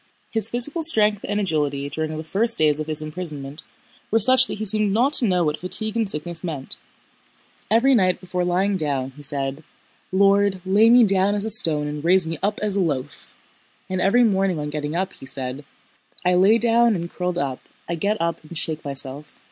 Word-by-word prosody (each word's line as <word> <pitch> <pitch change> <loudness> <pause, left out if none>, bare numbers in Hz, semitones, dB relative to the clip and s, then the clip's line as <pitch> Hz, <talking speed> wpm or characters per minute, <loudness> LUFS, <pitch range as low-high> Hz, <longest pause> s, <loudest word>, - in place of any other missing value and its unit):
His 225 -1 -2
physical 265 +8 -2
strength 215 -10 +3
and 205 0 0
agility 145 -7 -1
during 155 +2 -4
the 155 - -5
first 225 +8 +1
days 155 -1 +2
of 155 - -4
his 155 0 0
imprisonment 150 -3 -7 0.5
were 225 - +2
such 255 +3 +5
that - - -5
he 215 - -4
seemed 215 0 0
not 245 +8 +2
to 255 - +5
know 180 -2 +1
what 150 -1 -1
fatigue 215 +4 -5
and 225 -3 0
sickness 165 0 -4
meant. 150 -6 -5 0.9
Every 235 +6 +4
night 185 -6 +2
before 180 -1 -3
lying 190 +3 0
down, 140 -5 -2
he 145 - -12
said: 140 +1 -4 0.5
"Lord, 200 0 +3
lay 205 +4 +4
me 245 +1 +7
down 195 -1 +2
as 205 0 -1
a 220 - +2
stone 155 -8 +4
and 150 0 -5
raise 180 +1 +3
me 160 -1 -5
up 205 +2 -1
as 210 -2 0
a 200 - +1
loaf!" 145 -5 -4 0.6
and 185 -1 -1
every 240 +7 +4
morning 195 -5 +1
on 150 0 -4
getting 150 +1 -4
up, 185 +2 -2
he 135 - -12
said: 130 +1 -5 0.6
"I 180 - +3
lay 195 +5 +5
down 230 0 +3
and 170 -1 -4
curled 180 0 -4
up, 135 -5 -2 0.3
I 170 - -3
get 200 +6 -1
up 170 -1 -2
and 155 +2 -8
shake 155 0 -3
myself." 140 +1 -6
180 Hz, 205 wpm, -22 LUFS, 150-210 Hz, 0.9 s, me